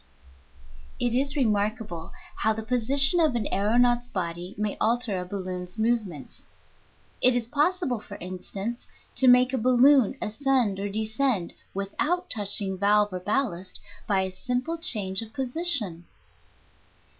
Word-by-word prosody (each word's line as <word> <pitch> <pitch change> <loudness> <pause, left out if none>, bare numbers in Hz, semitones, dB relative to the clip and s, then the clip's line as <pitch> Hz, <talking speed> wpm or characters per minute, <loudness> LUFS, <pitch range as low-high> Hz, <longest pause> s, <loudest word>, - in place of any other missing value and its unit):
It 240 -1 0
is 275 +3 0
remarkable 210 - -1 0.3
how 220 - +1
the 220 +1 -6
position 270 +7 +2
of 310 -6 +2
an 225 -3 -1
aëronaut's 240 +4 +2
body 175 -2 -5
may 210 -1 -2
alter 225 -4 +1
a 180 - -5
balloon's 185 0 -5
movements. 220 - -2 0.8
It 255 -1 +7
is 235 -2 -1
possible, 295 - 0
for - - -11
instance, 195 +6 -6 0.3
to 260 - +5
make 250 +1 +5
a 260 - 0
balloon 255 +1 +4
ascend 225 -2 0
or 200 +1 -3
descend, 220 -1 0 0.2
without 300 - -2
touching 200 -3 0
valve 205 0 +3
or 185 - -3
ballast, 195 -3 -2 0.3
by 195 -2 +2
a 190 0 -3
simple 250 - -3
change 205 - +2
of 225 -1 -10
position. 255 - 0
220 Hz, 135 wpm, -26 LUFS, 195-255 Hz, 0.8 s, It